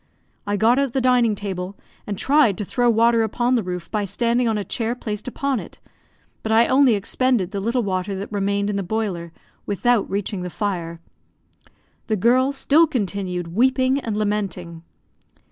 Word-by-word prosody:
I 205 0 0
got 230 +5 +4
out 275 -3 0
the 270 - +1
dining 245 -4 +3
table, 190 -1 -5 0.3
and 205 -2 -3
tried 275 -8 +3
to 210 - -3
throw 245 +4 +1
water 230 0 +4
upon 240 +3 0
the 245 - +3
roof 180 -3 -6
by 210 -2 0
standing 235 +4 0
on 220 -1 +1
a 205 - -2
chair 230 +3 -2
placed 215 -3 -5
upon 270 0 -1
it, - - -11 0.6
but 220 - -3
I 225 +1 +5
only 260 -3 +4
expended 215 -1 0
the 200 - -3
little 230 +4 0
water 190 0 -2
that 195 +2 -6
remained 200 0 0
in 200 - -2
the - - -1
boiler, 185 -4 -3 0.4
without 225 +2 +1
reaching 200 0 -3
the 180 - -4
fire. 170 -3 -3 1.1
The 220 - +1
girl 250 +6 +3
still 290 +4 +3
continued 190 - -3
weeping 260 +4 +2
and 225 -6 -3
lamenting. 195 -5 -3
215 Hz, 175 wpm, -22 LUFS, 195-245 Hz, 1.1 s, I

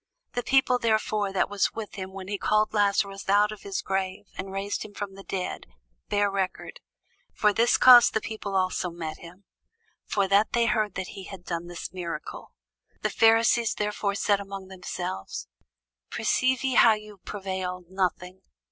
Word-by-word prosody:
The 245 - -1
people 260 -1 +3
therefore 215 -3 +1
that 195 - +1
was 205 -1 0
with 220 -2 -6
him 190 -1 -6
when 190 -1 -8
he 200 0 -3
called 215 0 +2
Lazarus 200 -1 +1
out 205 +1 +4
of 215 -2 -9
his 195 -1 -4
grave, 190 +1 -2
and 190 +1 -6
raised 195 +1 -3
him 205 -1 -12
from 200 -2 -5
the 195 - -11
dead, 185 -2 -4 0.4
bare 205 0 +2
record. 190 -1 -3 0.6
For 210 -1 +3
this 230 +3 +3
cause 245 -2 +9
the - - 0
people 210 -2 -5
also 185 -1 0
met 165 -2 -6
him, 175 +3 -13 0.6
for 200 -2 +1
that 200 +2 +3
they 235 -1 +3
heard 215 -4 0
that 190 -1 -4
he 195 - -9
had 190 -2 -10
done 170 0 -4
this 175 +1 -7
miracle. 170 -4 -6 0.5
The - - +1
Pharisees 225 +1 +4
therefore 210 -1 -1
said 200 0 +2
among 195 -1 -8
themselves, 180 - -5 0.6
Perceive 255 0 +1
ye 265 -1 +1
how 230 -2 +7
ye 215 0 -7
prevail 185 -2 -4
nothing? 185 0 -2
200 Hz, 170 wpm, -26 LUFS, 190-215 Hz, 0.6 s, cause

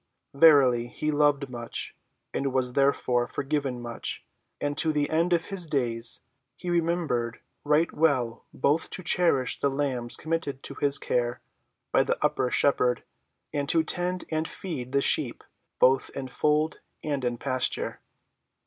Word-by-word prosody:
Verily 140 -5 +5
he 155 +5 -3
loved 145 -1 +2
much, 120 -2 -5 0.4
and 135 0 -1
was 130 -1 0
therefore 125 -3 +2
forgiven 140 -3 -2
much. 120 -1 -5 0.3
And 145 0 -2
to 160 -1 +6
the 150 -1 0
end 165 +3 +1
of 170 -2 +2
his 190 -4 0
days 120 -6 +1 0.3
he 175 +4 -5
remembered 165 -9 0 0.2
right 150 +3 +2
well 130 -7 +1
both 145 +5 +1
to 185 - -9
cherish 165 -7 +2
the 140 - +1
lambs 135 -4 -2
committed 155 -4 -3
to - - -6
his 140 -1 +2
care 120 0 -1 0.5
by - - +4
the - - 0
Upper 125 - +1
Shepherd, 125 -2 +2 0.5
and 145 0 -2
to 165 0 +3
tend 180 +2 -1
and 160 0 -1
feed 135 -10 -6
the 140 0 +2
sheep - - +2 0.3
both 130 +1 +3
in 135 - -4
fold 150 +4 0 0.2
and 145 -3 -2
in 120 -1 -1
pasture. 130 0 -1
140 Hz, 150 wpm, -27 LUFS, 125-160 Hz, 0.5 s, to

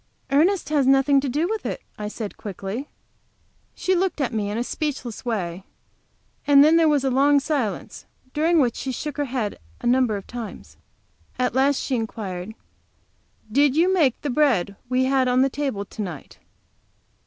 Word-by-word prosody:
"Ernest 335 +7 +3
has 290 -4 +2
nothing 270 +1 +5
to 275 - -2
do 300 +7 0
with 440 +2 -3
it," - - -3 0.2
I 210 - -5
said, 210 -1 -6
quickly. 205 +6 -6 0.9
She 375 - 0
looked 365 -2 0
at 260 -4 -1
me 210 -2 -1
in 210 - -3
a 235 - 0
speechless 260 -5 -4
way, 190 -7 -3 0.8
and 285 -1 +8
then 310 +2 +5
there 330 -1 +5
was 290 -2 +2
a 265 - +1
long 285 +2 +4
silence, 275 -7 -3 0.3
during 325 +3 +2
which 245 -5 +2
she 265 - -4
shook 295 +3 -5
her 290 - 0
head 245 -6 -3 0.2
a - - -9
number 245 -3 +3
of 195 - -9
times. 235 -3 -8 0.6
At 250 -2 0
last 270 +2 +3
she 265 - -1
inquired: 215 -3 -5 1.0
"Did 280 +3 +3
you 350 +4 +3
make 295 -10 +2
the 290 - -2
bread 245 -9 +2
we 255 0 +2
had 260 0 +2
on 250 +1 +3
the 270 - +1
table 265 -9 -3
to 215 - -8
night?" 175 -8 -7
260 Hz, 175 wpm, -23 LUFS, 220-290 Hz, 1.0 s, and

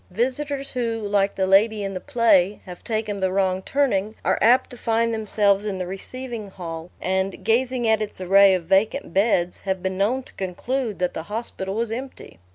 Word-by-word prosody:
Visitors 270 +7 -2
who, 230 -3 -2
like 200 -1 +1
the 190 - +1
lady 205 +2 +3
in 195 0 -3
the 185 - -4
play, 210 -7 +3
have 180 -2 -10
taken 215 -3 -2
the 190 -1 0
wrong 190 -1 +1
turning, 215 -4 0
are - - +2
apt 240 +4 +4
to - - -8
find 230 0 0
themselves 205 -2 +1
in 205 -3 -3
the 185 - -3
receiving 230 +4 -6
hall, 170 -3 -7
and, 190 +1 -2
gazing 245 +1 +1
at 220 0 +3
its 210 -3 -5
array 195 +1 +6
of 180 - -3
vacant 195 +3 +1
beds, 190 -3 +1
have 190 -1 -3
been 190 0 -2
known 245 +7 +1
to - - -16
conclude 215 +5 -3
that 180 -1 -1
the - - -4
hospital 205 -3 -4
was 230 0 -1
empty. 255 - -7
205 Hz, 190 wpm, -23 LUFS, 190-230 Hz, -, array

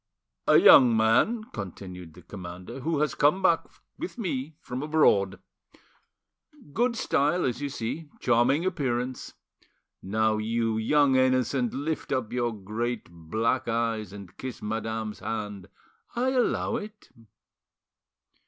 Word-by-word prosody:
"A - - +7
young 120 -4 +8
man," 120 - +3
continued 90 -4 -8
the 90 - -14
commander, 90 +5 -8
"who 150 +2 -1
has 150 - +1
come 150 +7 +2
back 170 -3 +3 0.3
with 345 -4 -6
me 155 - -3
from 125 -3 -6
abroad. 140 -11 +3 1.4
Good 240 +1 +1
style, 150 -3 +1
as 125 +1 -2
you 145 - -2
see, 140 +5 -5
charming 130 +7 +2
appearance. 130 -8 -2 0.7
Now, 110 +2 +1
you 115 +1 0
young 140 +4 +3
innocent, 130 -1 +1
lift 150 +3 -3
up 130 -5 -1
your 120 -1 0
great 110 +1 -4
black 110 +10 -1
eyes 115 -3 -1
and 100 -3 -11
kiss 130 -2 -6
madame's 110 0 -4
hand; 105 -4 -5 0.5
I 255 +2 +1
allow 250 -2 +1
it." 210 0 -10
120 Hz, 125 wpm, -27 LUFS, 110-145 Hz, 1.4 s, young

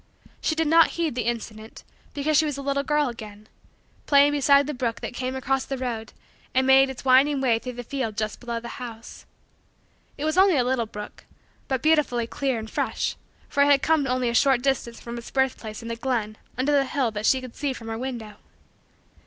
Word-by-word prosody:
She 315 - 0
did 325 0 +1
not 330 +1 +6
heed 330 -4 0
the 245 -1 -2
incident 220 -2 -5 0.3
because 300 +2 0
she 315 - +5
was 295 -2 -3
a 280 - -6
little 280 0 0
girl 295 +1 +1
again, 215 -3 -8 0.6
playing 285 0 +6
beside 280 0 +4
the 300 - -3
brook 245 -3 -2
that - - -5
came 255 +1 -3
across 265 0 0
the 270 - -4
road 235 -3 -4 0.4
and 260 0 +3
made 265 0 +6
its 265 0 -8
winding 270 +2 +5
way 240 -4 +2
through 250 +1 -6
the 245 0 -7
field 235 -4 -4
just 215 -1 -2
below 235 -1 -4
the 235 +1 -9
house. 230 -2 -9 0.9
It 290 - -3
was 310 +4 +2
only 380 -5 +5
a 250 - +3
little 245 -2 0
brook, 210 -1 -9 0.4
but 260 -2 -2
beautifully 300 -7 +2
clear 265 +1 -2
and 220 0 -5
fresh, - - -2 0.3
for 280 - 0
it 285 - +6
had 280 -1 +4
come 315 -3 +2
only 255 -1 0
a - - -2
short 260 0 +3
distance 265 -4 -1
from 235 0 -7
its 235 - -10
birth 265 -1 0
place 215 0 -8
in 230 - -5
a - - -2
glen 230 -3 -2 0.2
under 260 +3 +1
the 280 -1 +3
hill 260 -4 0
that 210 0 -2
she 265 - +4
could 255 -2 -10
see 285 -1 -1
from 235 -3 -8
her 225 - -3
window. 235 -5 -6
260 Hz, 220 wpm, -25 LUFS, 235-280 Hz, 0.9 s, not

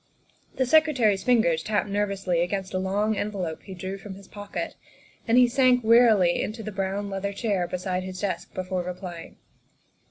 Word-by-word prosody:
The 260 - +1
Secretary's 255 -9 +3
fingers 220 -10 +3
tapped 210 +3 -1
nervously 200 -4 0
against 190 +2 -2
a 185 - 0
long 205 +3 0
envelope 195 -6 -3
he 190 - -10
drew 190 +2 -5
from 195 -1 -9
his 195 0 -14
pocket, 205 -1 -6 0.5
and 230 +2 +4
he 250 -1 +7
sank 250 0 +3
wearily 220 -6 +5
into 220 +2 -4
the 215 - -5
brown 195 +1 -2
leather 200 0 -3
chair 200 -4 -1
beside 180 0 -2
his 185 0 -7
desk 200 -2 -3
before 185 0 -2
replying. 175 -1 -7
200 Hz, 165 wpm, -26 LUFS, 185-220 Hz, 0.5 s, he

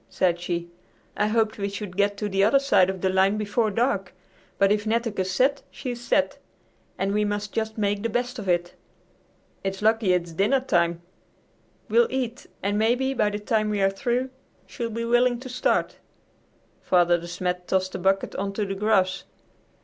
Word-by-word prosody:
said 175 -2 +1
she; 170 -1 -3 0.5
"I 210 - +1
hoped 220 -1 +1
we 200 0 -1
should 200 -2 -6
get 200 +1 +1
to 210 - -2
the 195 -1 +1
other 225 +7 +5
side 270 -9 +3
of 190 -1 -4
the 190 - +2
line 190 +2 +3
before 215 +2 0
dark, 200 -4 -1 0.4
but 195 0 +4
if 210 +1 0
Netteke's 220 -4 0
set, 265 +9 +2
she's 245 -3 -6
set, 240 - +1 0.6
and 195 +1 -1
we 210 0 +2
must 205 0 -3
just 220 0 -2
make 205 -1 0
the 230 - -1
best 245 +2 -2
of 195 -3 -4
it. 175 0 +1 0.9
It's 195 +1 -3
lucky 220 -3 +3
it's 175 -1 -1
dinner 200 +11 +2
time. 175 -8 0 0.8
We'll 475 0 +4
eat, 255 -2 -3 0.2
and 205 +1 0
maybe 250 +4 +2
by 215 -5 +2
the 205 - -3
time 215 +1 0
we 210 -1 -1
are 195 0 +3
through 245 +6 -1 0.3
she'll 235 -3 -5
be 230 +1 -3
willing 240 +1 +3
to 260 - -8
start." 250 0 0 0.8
Father 175 -1 +3
De 170 - -9
Smet 180 0 -3
tossed 185 0 0
a - - -4
bucket 195 +1 +1
on 195 +1 -2
to 210 +1 -1
the 195 - -3
grass. 195 -2 +1
205 Hz, 185 wpm, -25 LUFS, 190-230 Hz, 0.9 s, other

